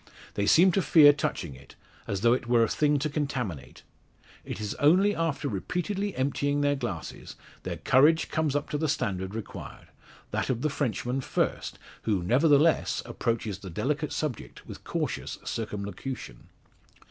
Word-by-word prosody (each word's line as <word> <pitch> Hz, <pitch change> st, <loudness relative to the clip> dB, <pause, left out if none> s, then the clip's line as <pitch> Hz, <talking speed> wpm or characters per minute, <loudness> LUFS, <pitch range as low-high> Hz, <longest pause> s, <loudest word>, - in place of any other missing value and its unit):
They 100 Hz, 0 st, -1 dB
seem 185 Hz, +3 st, +6 dB
to 195 Hz, -, +2 dB
fear 150 Hz, -4 st, +7 dB
touching 85 Hz, -, -3 dB
it, 65 Hz, +1 st, -15 dB, 0.3 s
as 100 Hz, -1 st, -2 dB
though 115 Hz, +1 st, +5 dB
it 125 Hz, -1 st, -2 dB
were 120 Hz, -1 st, +4 dB
a -, -, +2 dB
thing 150 Hz, -1 st, +2 dB
to 145 Hz, +2 st, -1 dB
contaminate. 135 Hz, -, -4 dB, 0.6 s
It -, -, -6 dB
is 105 Hz, -1 st, -3 dB
only 190 Hz, +8 st, +4 dB
after 160 Hz, -3 st, -1 dB
repeatedly 180 Hz, -, -2 dB
emptying 145 Hz, +2 st, 0 dB
their 145 Hz, 0 st, +2 dB
glasses, 95 Hz, -, -6 dB, 0.3 s
their -, -, -5 dB
courage 150 Hz, +5 st, +4 dB
comes 155 Hz, -3 st, 0 dB
up 145 Hz, -, -1 dB
to 150 Hz, -, -1 dB
the 160 Hz, -1 st, 0 dB
standard 95 Hz, -6 st, -2 dB
required; 115 Hz, -3 st, -8 dB, 0.4 s
that -, -, -1 dB
of 125 Hz, -2 st, -1 dB
the 155 Hz, -, +1 dB
Frenchman 130 Hz, -1 st, -2 dB
first; -, -, -2 dB, 0.2 s
who, 100 Hz, -5 st, 0 dB
nevertheless, 145 Hz, -, +3 dB
approaches 110 Hz, -4 st, -2 dB
the 95 Hz, -, -8 dB
delicate 150 Hz, -, -2 dB
subject 145 Hz, -7 st, -4 dB
with -, -, -10 dB
cautious -, -, -3 dB
circumlocution. 105 Hz, -, -5 dB
135 Hz, 155 wpm, -28 LUFS, 105-150 Hz, 0.6 s, fear